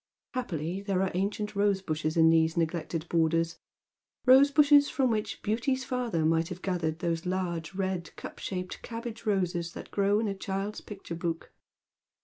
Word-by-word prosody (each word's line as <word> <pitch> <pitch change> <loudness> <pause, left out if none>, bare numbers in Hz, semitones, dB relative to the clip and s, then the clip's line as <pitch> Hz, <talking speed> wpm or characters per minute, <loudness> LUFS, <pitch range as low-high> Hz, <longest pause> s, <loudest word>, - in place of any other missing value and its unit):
Happily 180 - -3
there 195 -2 0
are 190 - 0
ancient 205 +3 -2
rose 200 -1 +2
bushes 155 -1 -2
in 160 0 +6
these 160 0 +3
neglected 165 0 -1
borders, 165 0 +1 0.3
— - - -47
rose 265 +2 +7
bushes 285 0 +6
from 260 -3 +1
which 215 -1 -2
Beauty's 250 +5 0
father 235 -12 -1
might 165 +1 +2
have 180 0 -8
gathered 170 -4 -1
those 170 0 -2
large 180 -2 -2
red 185 -4 -3
cup - - -9
shaped 180 -1 -5
cabbage 230 -1 -7
roses 180 -4 0
that - - -9
grow 200 +1 +2
in 220 - 0
a 200 - -1
child's 195 +2 -4
picture 195 -4 -8
book. 165 0 -4
185 Hz, 165 wpm, -29 LUFS, 165-210 Hz, 0.3 s, rose